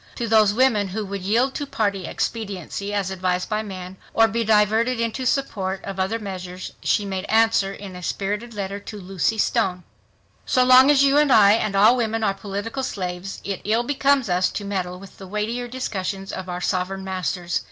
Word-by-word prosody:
To 235 - -3
those 215 -2 +5
women 220 -3 +2
who 205 +3 -4
would 200 0 -5
yield 235 +8 +1
to 290 - -4
party 200 -7 -1
expediency 200 -2 -4
as 200 -2 -1
advised 185 -1 -1
by 215 0 0
men, 190 -3 -8 0.2
or 225 0 +6
be 230 +1 -1
diverted 220 +3 +2
into 230 +3 -1
support 195 -9 -1
of 195 -1 -6
other 190 +4 0
measures, 185 -3 -7
she 205 - +1
made 190 -1 -3
answer 225 -3 +3
in 195 -2 -9
a 180 - -8
spirited 205 +5 -3
letter 200 0 -4
to 210 +1 -9
Lucy 195 +3 -1
Stone: 190 -5 0 0.6
"So 255 - +2
long 255 +2 +7
as 280 -2 +5
you 280 +1 +4
and 295 -2 +3
I 205 -4 +7
and 215 -2 +1
all 215 +5 +6
women 225 -2 -1
are 200 - +2
political 205 +5 -5
slaves, 185 -5 -4
it 200 -2 -4
ill 225 +3 +1
becomes 275 -1 +2
us 180 0 +2
to 205 - -4
meddle 180 -2 -3
with 195 0 -14
the 190 - -9
weightier 220 +5 -3
discussions 195 -6 -4
of 185 0 -6
our' 180 0 -4
sovereign 190 +1 -1
masters. 180 -2 -2
205 Hz, 195 wpm, -23 LUFS, 190-230 Hz, 0.6 s, long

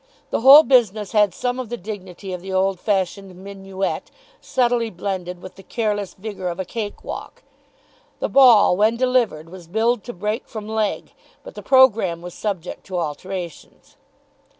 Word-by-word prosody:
The - - 0
whole 275 +5 +10
business 220 -7 +2
had 210 -3 +3
some 250 +5 -3
of 250 -4 -5
the 240 - -4
dignity 190 -2 -8
of 180 - -6
the 190 +1 -7
old 190 0 +1
fashioned 195 -1 -2
minuet, 195 0 -5 0.3
subtly 240 -2 0
blended 180 -2 -5
with 185 - -11
the - - -11
careless 205 -2 -3
vigour 195 -2 -6
of 175 +1 -4
a 190 - -2
cake 210 +1 -6
walk. - - -8 0.8
The - - -1
ball, 240 -9 +6
when 215 +4 +2
delivered, 240 -11 0
was 180 -3 -11
billed 220 +4 0
to 240 - -6
break 210 +6 -3
from 215 -3 -7
leg, 220 -1 -2 0.3
but - - -11
the - - -9
programme 225 -10 +3
was 175 0 -8
subject 190 -5 -5
to 185 -2 -4
alterations. 175 +2 -6
200 Hz, 165 wpm, -21 LUFS, 185-230 Hz, 0.8 s, whole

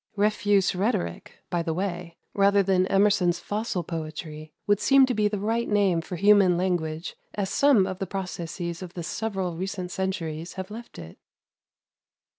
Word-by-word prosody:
Refuse 205 -2 +2
rhetoric, 185 - -2
by 175 - +1
the 165 -1 -2
way, 175 -2 -4 0.2
rather 200 0 +4
than 185 -1 +2
Emerson's 195 -3 +3
"fossil 205 -4 -3
poetry," 155 -1 -6
would 205 -1 +3
seem 270 +4 +6
to 255 - -1
be 210 -2 +2
the 210 0 -2
right 225 +4 -1
name 195 -5 +2
for 180 - -6
human 200 -1 +5
language 175 -2 -2 0.2
as 200 -2 -2
some 275 -9 +4
of 185 0 -5
the 195 - -3
processes 175 -2 -5
of 180 -1 -9
the 175 - -4
several 190 -1 -3
recent 185 0 -4
centuries 170 -3 -3
have 190 +1 -7
left 235 +2 -9
it. 80 -1 -10
190 Hz, 160 wpm, -26 LUFS, 170-205 Hz, 0.2 s, seem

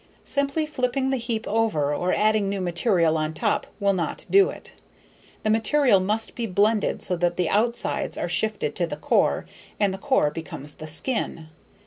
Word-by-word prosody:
Simply 280 +2 0
flipping 265 -2 -1
the 265 - +1
heap 230 -2 -3
over 200 -10 0
or 180 +5 -1
adding 215 -2 +2
new 200 0 -2
material 175 -2 +1
on 155 0 -3
top - - -1
will 200 -1 +2
not 170 -4 -3
do 395 0 +6
it. - - -10 0.7
The 215 - +1
material 225 0 +3
must 210 +4 -1
be 235 -1 -3
blended 205 +2 +1
so 180 - +2
that 175 0 0
the 180 -3 0
outsides 235 +3 +1
are - - -2
shifted - - -1
to - - 0
the - - -6
core - - +1 0.3
and 200 -2 +2
the 195 - -7
core 265 - +2
becomes 150 -2 -5
the 155 - -9
skin. 160 - -1
210 Hz, 175 wpm, -24 LUFS, 175-235 Hz, 0.7 s, do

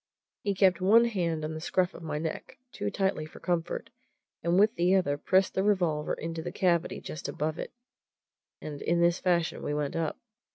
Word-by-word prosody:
He 200 -1 -1
kept 185 -1 +4
one 220 +5 +6
hand 170 -8 -1
on 155 - -4
the 155 - -5
scruff 180 +2 +1
of - - -10
my 155 -2 -3
neck 160 +1 -5
too 105 - -3
tightly 190 - -1
for - - -13
comfort 175 -2 -2 0.5
and 170 +2 +2
with 210 +3 +5
the 180 0 +3
other 160 -7 +2
pressed 190 +6 +2
the 190 - +1
revolver 175 -7 +1
into 165 0 -5
the - - -5
cavity 175 -2 +1
just 155 - -6
above 155 +2 -2
it, - - -5 0.9
and 145 -2 -7
in 170 +1 +1
this 170 +1 +3
fashion 175 -3 +1
we 145 - -2
went 150 -1 -2
up. 165 -2 -1
170 Hz, 195 wpm, -29 LUFS, 155-185 Hz, 0.9 s, one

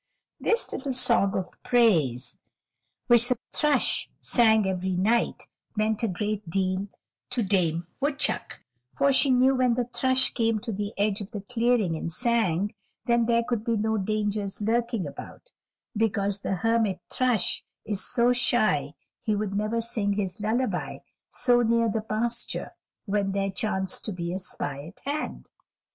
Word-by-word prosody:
This 460 +2 0
little 270 -1 -3
song 230 -5 +3
of 185 -1 -6
praise 165 - +2 0.7
which 240 -1 +6
the 250 - +1
thrush 300 -3 +1
sang 220 -3 +3
every 185 0 -2
night 220 +6 +1 0.3
meant 215 0 0
a 230 - +1
great 210 0 -3
deal 185 +2 -1 0.4
to 240 - 0
Dame 175 -4 +1
Woodchuck, 285 +1 -1 0.3
for 275 - +1
she 275 - +3
knew 255 +1 +4
when 255 -2 +2
the 245 0 0
thrush 260 +1 +3
came 225 -2 +1
to 230 0 -3
the 205 0 -3
edge 205 +1 0
of 200 - -7
the 210 -3 -6
clearing 230 -4 +1
and 165 +1 -4
sang, 210 -2 +2 0.3
then 235 -1 +2
there 235 0 +2
could 230 -2 -2
be 230 -1 0
no 220 +1 0
dangers 205 0 -2
lurking 230 -2 0
about, 145 - -10 0.4
because 205 -2 +1
the 195 - -2
Hermit 225 -2 +1
Thrush 250 -5 +1 0.2
is 205 -2 0
so 240 +1 +3
shy 210 - +1 0.3
he 215 - 0
would 205 -1 -3
never 215 +3 -1
sing 215 -3 0
his 195 -1 -2
lullaby 235 +5 -1 0.3
so 245 -2 +3
near 230 0 +2
the 220 - -1
pasture 230 +2 -1 0.3
when 200 -2 -1
there 195 0 -1
chanced 190 -1 0
to 215 - 0
be 175 -2 -4
a 190 - -3
spy 145 -6 -2
at 180 - -12
hand. 290 +2 -4
215 Hz, 155 wpm, -26 LUFS, 195-235 Hz, 0.7 s, which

